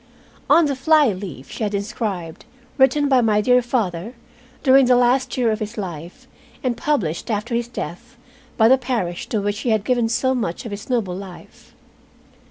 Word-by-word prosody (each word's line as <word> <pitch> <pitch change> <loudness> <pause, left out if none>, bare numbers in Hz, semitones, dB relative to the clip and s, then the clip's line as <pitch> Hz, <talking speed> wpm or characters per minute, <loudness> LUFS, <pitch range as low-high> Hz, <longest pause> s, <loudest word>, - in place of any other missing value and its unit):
On 335 - +6
the 280 -2 -1
fly 300 +1 +4
leaf 180 -9 -8
she - - -8
had 210 -1 -1
inscribed, 200 -5 -4 0.3
"Written 270 +2 +4
by 260 -3 +4
my 215 -2 +2
dear 250 +3 +4
father 230 -3 -2 0.5
during 270 -1 +6
the 250 - +5
last 250 +2 +2
year 240 -3 +2
of 215 - -2
his 215 +1 -6
life, 175 -4 -7 0.4
and 250 -2 0
published 230 - -2
after 220 +2 -2
his 235 0 -1
death 235 +2 -7 0.4
by 220 - +5
the 260 +2 +5
parish 230 -9 -3
to 220 - -1
which 205 +1 -2
he 245 - -2
had 220 -2 +1
given 240 -3 +1
so 260 +3 +1
much 220 -8 -3
of 230 - -6
his 205 +4 -8
noble 220 -8 -1
life." 190 -2 -12
230 Hz, 180 wpm, -21 LUFS, 200-255 Hz, 0.5 s, On